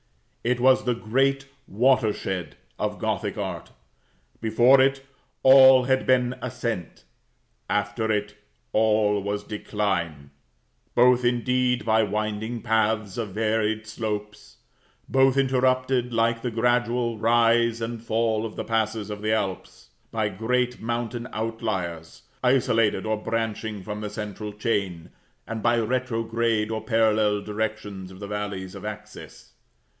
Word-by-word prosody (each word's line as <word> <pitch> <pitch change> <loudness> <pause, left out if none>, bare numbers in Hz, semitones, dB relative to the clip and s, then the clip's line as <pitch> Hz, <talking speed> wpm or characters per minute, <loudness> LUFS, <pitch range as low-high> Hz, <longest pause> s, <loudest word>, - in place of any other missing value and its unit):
It 125 +1 +1
was 130 +1 +4
the 125 -1 +1
great 135 +5 +1 0.2
watershed 105 - 0 0.2
of - - -2
Gothic - - -2
art. - - -5 0.7
Before 120 +4 +5
it, 135 0 +1 0.4
all 130 -1 +8
had 130 +1 +1
been 125 -1 +3
ascent; 115 - -4 0.7
after 105 +2 0
it, 105 0 -1 0.4
all 105 -2 +2
was 100 +1 -3
decline; 95 -9 -3 0.6
both, 125 0 +5
indeed, 125 +1 +1
by 110 0 +3
winding 110 +2 -2
paths 110 -2 0
and 110 -4 -3
varied 110 +1 0
slopes; 105 -1 -5 0.5
both 135 0 +3
interrupted, 130 -1 +1
like 115 0 +1
the 125 - -2
gradual 120 0 0
rise 115 0 +3
and 115 0 -5
fall 110 -1 0
of 110 -2 -6
the - - -4
passes 110 -2 -1
of 105 0 -6
the 110 0 0
Alps, 95 - -3 0.2
by 110 -2 0
great 125 +5 -1
mountain 120 +1 -3
outliers, 100 -7 -4 0.2
isolated 125 -5 +2
or 110 0 0
branching 110 -3 -3
from 105 +1 -5
the 105 - -4
central 105 0 -6
chain, 100 -6 -2 0.3
and 115 -1 -5
by 120 +1 +3
retrograde 115 -2 0
or 110 -1 -2
parallel 110 -3 +2
directions 105 -3 -4
of 95 0 -13
the 100 - -6
valleys 100 -2 -4
of - - -9
access. 105 0 -9
110 Hz, 125 wpm, -25 LUFS, 105-120 Hz, 0.7 s, all